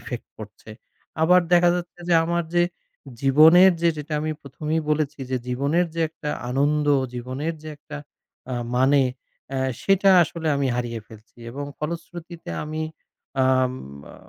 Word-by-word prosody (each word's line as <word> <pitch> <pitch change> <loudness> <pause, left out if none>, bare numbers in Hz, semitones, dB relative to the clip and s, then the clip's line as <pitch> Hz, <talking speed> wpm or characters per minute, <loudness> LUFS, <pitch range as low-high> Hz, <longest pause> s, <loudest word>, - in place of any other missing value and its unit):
effect 125 -3 -7
পড়ছে। 110 0 -11 0.5
আবার 180 +2 +6
দেখা 175 0 +6
যাচ্ছে 175 0 -6
যে 170 - +4
আমার 170 +1 0
যে 175 - +5 0.6
জীবনের 160 +7 +7
যে 170 - +5
যেটা 150 +1 -7
আমি 155 0 -2
প্রথমেই 150 +4 -3
বলেছি 150 -1 0
যে 130 - +1
জীবনের 140 +8 +1
যে 165 - -2
একটা 150 -2 -6 0.2
আনন্দ, 145 +3 +1 0.3
জীবনের 130 +7 -4
যে 155 - -8
একটা 150 0 -10 0.6
আ - - -1 0.2
মানে 135 +2 +4 0.5
এ - - 0 0.2
সেটা 195 0 +4
আসলে 165 0 -3
আমি 140 -1 0
হারিয়ে 120 -2 -3
ফেলছি 110 +2 -17
এবং 140 +4 -5
ফলশ্রুতিতে 170 +2 -7
আমি 155 +1 -4 0.6
আম 130 -1 +3 0.4
আ - - -14
150 Hz, 145 wpm, -23 LUFS, 130-170 Hz, 0.6 s, জীবনের